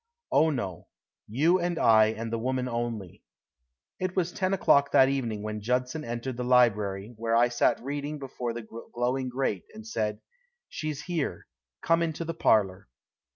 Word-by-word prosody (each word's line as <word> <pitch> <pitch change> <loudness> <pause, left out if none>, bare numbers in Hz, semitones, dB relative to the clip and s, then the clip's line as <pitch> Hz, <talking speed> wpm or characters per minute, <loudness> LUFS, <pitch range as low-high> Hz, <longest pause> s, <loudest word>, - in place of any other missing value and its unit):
"Oh, 160 - +4
no. 100 - -4 0.4
You 155 - +3
and 175 -1 -1
I 110 -4 +6
and 110 +1 -4
the 115 - -1
woman 130 +1 -1
only." 115 -6 -4 0.8
It 185 0 -2
was 180 -2 0
ten 185 +1 -1
o'clock 140 -7 +3
that 130 0 +6
evening 115 -6 -2
when 105 0 -4
Judson 125 +6 -1
entered 120 +1 -4
the 125 - -2
library, 105 -4 +2
where 115 0 0
I 120 +1 +4
sat 120 - +2
reading 145 +2 -4
before 130 -3 -4
the 115 -1 -7 0.3
glowing 125 +2 0
grate, 125 -6 -2
and 220 0 -10
said: 105 - -2 0.5
"She's 150 -2 -5
here. 175 -5 -3 0.4
Come 165 0 +3
into 165 0 -2
the 165 - -3
parlor." 100 - +2
125 Hz, 160 wpm, -28 LUFS, 115-150 Hz, 0.8 s, I